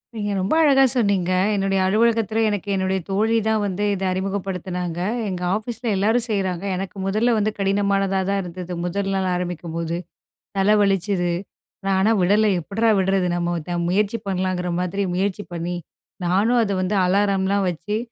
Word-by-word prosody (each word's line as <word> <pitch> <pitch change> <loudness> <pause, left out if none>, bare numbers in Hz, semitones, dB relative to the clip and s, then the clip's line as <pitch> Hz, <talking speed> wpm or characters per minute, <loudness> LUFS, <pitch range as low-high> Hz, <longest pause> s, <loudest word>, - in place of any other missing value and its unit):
நீங்க 205 -2 -2
ரொம்ப 190 +7 0
அழகா 275 -3 +5
சொன்னிங்க. 200 -7 +1 0.2
"என்னுடைய 195 -1 +1
அலுவலகத்தில 225 +1 +2
எனக்கு 205 -1 -3
என்னுடைய 190 0 0
தோழி 220 +4 +1
தான் 220 -1 +2
வந்து 200 0 -2
இதை 190 0 -2
அறிமுகப்படுத்தினாங்க. 185 -2 -3 0.3
எங்க 180 -2 -4
ஆஃபீஸில 235 +2 -5
எல்லாரும் 225 +5 +2
செய்றாங்க. 190 -4 -1
எனக்கு 190 +2 -5
மொதல்ல 215 +5 +2
வந்து 215 +1 +1
கடினமானதா 195 -1 +1
தான் 200 0 +1
இருந்தது. 180 0 -7
முதல் 195 +2 -2
நாள் 190 -1 0
ஆரம்பிக்கும்போது 170 -1 -3 0.6
தலை 200 +2 +4
வலிச்சுது. 195 -2 +1 0.6
நான் 195 -1 +2
ஆனா 215 +4 +3
விடலை 205 +4 +3
எப்படிறா 225 +7 0
விடுறது 190 -1 +1
நம்ம 175 0 -2
முயற்சி 210 +4 +1
பண்ணலாங்கிற 185 -1 -1
மாதிரி 190 +3 -1
முயற்சி 195 +2 -1
பண்ணி, 175 +1 -3 0.5
நானும் 210 +7 +3
அதை 200 -2 -1
வந்து 190 +3 0
அலாரம்லாம் 195 0 +2
வச்சு 175 +6 -3
195 Hz, 145 wpm, -22 LUFS, 180-205 Hz, 0.6 s, அழகா